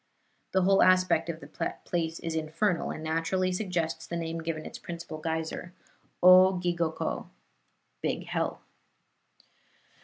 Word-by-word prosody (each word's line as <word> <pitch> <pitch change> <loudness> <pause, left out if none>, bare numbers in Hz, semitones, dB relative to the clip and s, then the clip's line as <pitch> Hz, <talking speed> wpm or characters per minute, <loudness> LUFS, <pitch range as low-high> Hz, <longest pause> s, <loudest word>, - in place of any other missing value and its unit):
The 190 -1 +3
whole 195 +1 +5
aspect 185 -3 +4
of 165 -1 -4
the - - -4
place 165 -2 -2
is 165 - -3
infernal, 165 +3 0
and 155 - -5
naturally 165 +4 0
suggests 180 -4 -2
the 170 - -3
name 165 0 -3
given 160 -1 -4
its - - -8
principal 170 -2 -7
geyser, 160 +2 -3 0.5
O 185 +1 +8
gigoko 170 -2 -1 0.7
(Big - - -2
Hell). - - -2
170 Hz, 125 wpm, -29 LUFS, 160-185 Hz, 0.7 s, O